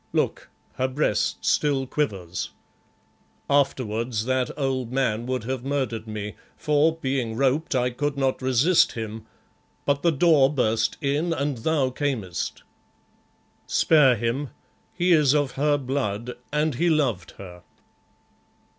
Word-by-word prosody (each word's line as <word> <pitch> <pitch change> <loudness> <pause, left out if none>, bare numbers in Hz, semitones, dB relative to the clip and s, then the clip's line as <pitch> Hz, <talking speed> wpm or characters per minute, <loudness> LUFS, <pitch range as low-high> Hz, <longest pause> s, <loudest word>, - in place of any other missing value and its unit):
Look, - - -1 0.3
her 130 - +1
breast 130 -5 -1
still 140 -3 +2
quivers. 95 - -3 1.0
Afterwards, 120 -5 0
that 130 -1 0
old 130 -4 -1
man 125 -3 0
would 130 -3 -2
have 130 +1 -3
murdered 130 -5 -2
me, 105 -1 -5 0.2
for, 150 +1 +2
being 130 -7 -2
roped, 140 +4 +1
I 125 0 +1
could 145 +3 -2
not 135 -1 0
resist 130 +7 +3
him, 110 -1 -6 0.6
but 140 0 +1
the 170 - +3
door 145 -3 +4
burst 115 -5 0
in 150 +4 0
and 140 -5 -2
thou 140 0 +1
camest. 125 -10 -3 1.0
Spare 145 -6 +4
him, 120 +5 -2 0.4
he 180 0 +1
is 150 -4 +5
of 145 -3 +1
her 145 +2 +1
blood, 125 -4 -3 0.2
and 150 +1 +1
he 170 +8 +1
loved 130 - 0
her." 90 -2 -10
130 Hz, 130 wpm, -24 LUFS, 115-145 Hz, 1.0 s, is